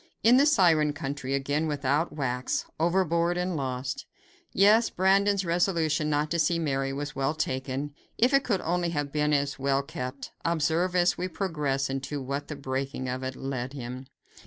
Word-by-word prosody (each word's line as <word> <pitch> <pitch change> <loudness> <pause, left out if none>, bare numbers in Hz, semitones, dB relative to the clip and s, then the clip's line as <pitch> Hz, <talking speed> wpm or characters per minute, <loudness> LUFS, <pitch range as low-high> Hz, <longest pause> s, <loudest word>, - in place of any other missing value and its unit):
In 240 +3 +7
the 280 +2 +5
Siren 165 - +4
country 140 -3 -3
again 145 +3 0
without 145 +2 0
wax! 125 -4 -2
Overboard 170 0 +2
and 180 0 -1
lost! 130 -2 -3 0.4
Yes, 215 +4 +5
Brandon's 195 +1 +2
resolution 165 -3 +1
not 150 0 0
to 170 - 0
see 165 +2 +2
Mary 135 -4 -1
was 145 +2 -5
well 135 +3 0
taken, 135 0 -3 0.2
if 245 +4 +3
it 275 0 +5
could 200 -6 0
only 175 +1 0
have 145 -3 -2
been 150 0 +1
as 140 -1 0
well 135 0 +1
kept. 135 -2 -6
Observe, 170 +2 +1
as 175 0 +3
we 180 - -1
progress, 150 -8 -1
into 135 +2 -3
what 140 +2 -4
the 150 - -5
breaking 135 -1 -3
of 125 +1 -3
it 130 0 -4
led 130 -1 -4
him. 130 -1 -7
150 Hz, 170 wpm, -27 LUFS, 135-175 Hz, 0.4 s, In